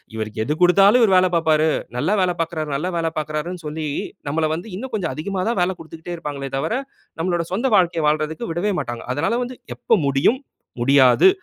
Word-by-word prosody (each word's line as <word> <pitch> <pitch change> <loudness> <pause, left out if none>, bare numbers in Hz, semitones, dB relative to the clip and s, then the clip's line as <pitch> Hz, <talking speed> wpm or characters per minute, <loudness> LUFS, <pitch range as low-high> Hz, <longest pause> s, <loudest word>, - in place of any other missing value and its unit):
இவருக்கு 110 0 -5
எது 150 - -1
குடுத்தாலும் 195 +6 +6
இவர் 205 -4 +4
வேலை 185 0 +5
பார்ப்பாரு. 160 -1 +3 0.3
நல்லா 155 +11 +1
வேலை 180 -1 +2
பார்க்கிறார், 160 -2 -2
நல்லா 165 +7 -2
வேலை 165 -1 0
பார்க்கிறாருன்னு 155 +4 -3
சொல்லி, 155 +1 -4 0.4
நம்மள 155 +1 +1
வந்து 175 +7 -5
இன்னும் 260 +4 -6
கொஞ்சம் 185 -6 -1
அதிகமா 185 +4 -3
தான் 235 - -1
வேலை 180 +2 +1
குடுத்துக்கிட்டே 165 +2 -8
இருப்பாங்களே 145 -4 -5
தவிர, 220 - -1 0.4
நம்மளுடைய 170 -1 -1
சொந்த 250 +7 +1
வாழ்க்கையை 170 -4 +2
வாழ்றதற்கு 155 +7 -1
விடவே 185 +5 0
மாட்டாங்க. 120 0 -5
அதனால 165 - 0
வந்து 250 0 -7 0.2
எப்ப 225 - +2
முடியும், 140 - +2 0.4
முடியாது. 135 - +6
165 Hz, 180 wpm, -21 LUFS, 150-190 Hz, 0.4 s, குடுத்தாலும்